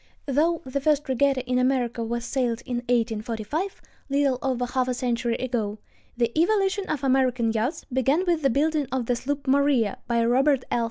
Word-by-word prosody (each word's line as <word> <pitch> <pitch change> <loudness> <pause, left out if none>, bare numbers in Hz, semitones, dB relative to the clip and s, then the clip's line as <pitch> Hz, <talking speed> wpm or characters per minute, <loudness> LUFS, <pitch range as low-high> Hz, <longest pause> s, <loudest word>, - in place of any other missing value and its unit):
Though 315 +5 +1
the 270 +2 -3
first 295 0 +1
regatta 265 0 +1
in 250 0 +1
America 250 -2 0
was 235 +1 -3
sailed 240 -4 -1
in 250 -2 -2
1845, 235 - -2 0.3
little 275 -2 +1
over 255 -2 -1
half 255 +1 -1
a 250 - -1
century 240 -1 -1
ago, 230 -5 -2 0.4
the 235 -1 +1
evolution 390 +3 +1
of 290 -3 -2
American 255 -3 +2
yachts 230 +8 -2
began 270 +8 +2
with 340 -3 +1
the 275 - +3
building 295 +2 +1
of 260 -2 -1
the 245 - +1
sloop 280 +3 -3
Maria 270 -6 +2
by 235 -1 +2
Robert 265 +2 +3
L. - - +2
255 Hz, 175 wpm, -25 LUFS, 240-285 Hz, 0.4 s, the